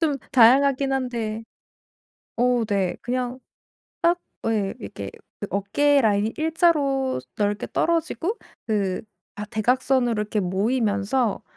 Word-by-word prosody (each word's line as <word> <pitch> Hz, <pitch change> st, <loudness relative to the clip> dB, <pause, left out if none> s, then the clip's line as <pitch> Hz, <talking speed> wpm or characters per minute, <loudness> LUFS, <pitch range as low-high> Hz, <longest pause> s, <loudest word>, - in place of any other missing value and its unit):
좀 305 Hz, -4 st, +1 dB, 0.2 s
다양하긴 270 Hz, +2 st, +5 dB
한데 230 Hz, -4 st, -2 dB, 0.9 s
어우 245 Hz, -1 st, +2 dB
네. 195 Hz, -4 st, 0 dB
그냥 250 Hz, +1 st, -3 dB, 0.6 s
딱 345 Hz, +1 st, +3 dB, 0.3 s
어 -, -, +2 dB
예 200 Hz, -3 st, -1 dB
이렇게 100 Hz, 0 st, -7 dB, 0.3 s
그 205 Hz, -, -3 dB
어깨 280 Hz, +9 st, +2 dB
라인이 210 Hz, 0 st, +1 dB
일자로 305 Hz, -, +1 dB, 0.2 s
넓게 205 Hz, 0 st, 0 dB
떨어지고 335 Hz, +4 st, 0 dB, 0.3 s
그 200 Hz, -4 st, -1 dB, 0.3 s
아 210 Hz, -, -4 dB
대각선으로 245 Hz, +3 st, +1 dB
이렇게 210 Hz, 0 st, -3 dB
모이면서 210 Hz, +3 st, 0 dB
240 Hz, 245 characters per minute, -24 LUFS, 210-270 Hz, 0.9 s, 다양하긴